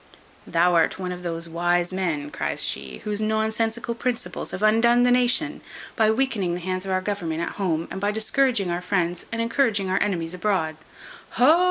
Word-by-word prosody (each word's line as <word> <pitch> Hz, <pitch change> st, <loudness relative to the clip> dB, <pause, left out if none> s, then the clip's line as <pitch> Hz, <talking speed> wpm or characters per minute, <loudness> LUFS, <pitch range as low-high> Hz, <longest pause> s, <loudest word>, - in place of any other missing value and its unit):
"Thou 175 Hz, +1 st, +3 dB
art 165 Hz, -1 st, +3 dB
one 185 Hz, -1 st, -4 dB
of 180 Hz, 0 st, -6 dB
those 170 Hz, -1 st, -3 dB
wise 175 Hz, +2 st, 0 dB
men," 160 Hz, -6 st, -2 dB
cries -, -, -1 dB
she, 65 Hz, -1 st, -2 dB
"whose 210 Hz, 0 st, -2 dB
nonsensical 220 Hz, +2 st, 0 dB
principles 240 Hz, 0 st, -3 dB
have 190 Hz, -, -5 dB
undone 235 Hz, +3 st, +4 dB
the 245 Hz, -, +4 dB
nation; 250 Hz, +5 st, +2 dB, 0.3 s
by 220 Hz, -2 st, +3 dB
weakening 220 Hz, -7 st, 0 dB
the -, -, -4 dB
hands 185 Hz, +1 st, -3 dB
of -, -, -2 dB
our 185 Hz, 0 st, +1 dB
government 175 Hz, -5 st, -3 dB
at -, -, -2 dB
home, 165 Hz, -3 st, 0 dB
and 190 Hz, -, -5 dB
by 205 Hz, -, +1 dB
discouraging 220 Hz, -2 st, +1 dB
our 175 Hz, +1 st, -2 dB
friends 180 Hz, -2 st, -1 dB
and 230 Hz, -, -3 dB
encouraging 230 Hz, -5 st, +1 dB
our -, -, +1 dB
enemies 175 Hz, -5 st, -1 dB
abroad." 180 Hz, -4 st, 0 dB, 0.6 s
"Ho! 305 Hz, +7 st, +6 dB
195 Hz, 185 wpm, -24 LUFS, 175-225 Hz, 0.6 s, Ho